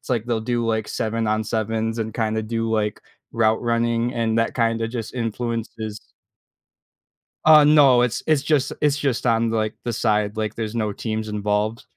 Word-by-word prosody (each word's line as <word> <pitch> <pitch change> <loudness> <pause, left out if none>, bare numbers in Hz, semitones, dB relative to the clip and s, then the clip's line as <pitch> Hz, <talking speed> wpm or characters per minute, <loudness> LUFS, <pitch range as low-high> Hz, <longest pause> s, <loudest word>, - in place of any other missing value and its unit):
it's - - -16
like 120 -4 0
they'll 120 -2 -1
do, 120 +1 -1
like, 110 -2 -1
7 115 0 -2
on 110 +1 0
sevens 110 +1 -2
and 110 -1 -3
kind 110 -1 -1
of 110 0 -4
do, 115 0 -1
like, 105 -2 -1 0.3
route 110 -1 +2
running 115 0 0
and 115 -1 0
that 115 - 0
kinda 115 -1 0
just 115 -2 -5
influences 115 -2 -4 1.4
Uh, 155 -1 +8
no. 145 -5 +6
It's 120 -1 -1
it's 155 -3 +2
just 145 -2 +1
it's 150 -1 +2
just 135 -4 -1
on, 115 -1 +2
like, 110 -1 -1
the 120 - -2
side, 105 -1 0
like, 110 -1 -2
there's 110 -1 -4
no 110 -3 -1
teams 110 0 -4
involved. 105 +2 -1
115 Hz, 180 wpm, -22 LUFS, 110-120 Hz, 1.4 s, Uh